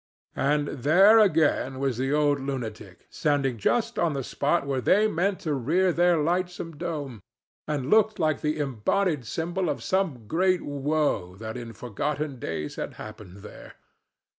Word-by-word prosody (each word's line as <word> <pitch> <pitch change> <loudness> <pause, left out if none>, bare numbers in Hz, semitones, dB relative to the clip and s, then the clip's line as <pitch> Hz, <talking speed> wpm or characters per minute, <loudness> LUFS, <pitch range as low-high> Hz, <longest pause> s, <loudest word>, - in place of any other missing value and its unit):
And 145 +1 +1
there 185 - +5
again 155 -8 +2
was 135 -3 -1
the 135 +1 0
old 145 -1 +2
lunatic 115 -8 -6
standing 140 -5 0
just 230 - 0
on 170 -3 +1
the 135 -1 -3
spot 145 +5 0
where 135 -2 -1
they 205 - +4
meant 195 0 -1
to 155 -6 -1
rear 170 +8 +1
their 175 0 +3
lightsome 175 +1 -2
dome, 145 - -5 0.5
and 145 -3 -2
looking 220 0 +4
like 155 -2 0
the 150 0 -1
embodied 145 - 0
symbol 170 - -2
of - - -3
some 175 - -1
great 180 - +1
woe 145 - -1
that 110 +2 -7
in 120 -2 -7
forgotten 135 +5 -4
days 80 -7 -5
had - - -5
happened 105 -3 -11
there. - - -12
145 Hz, 155 wpm, -26 LUFS, 125-175 Hz, 0.5 s, there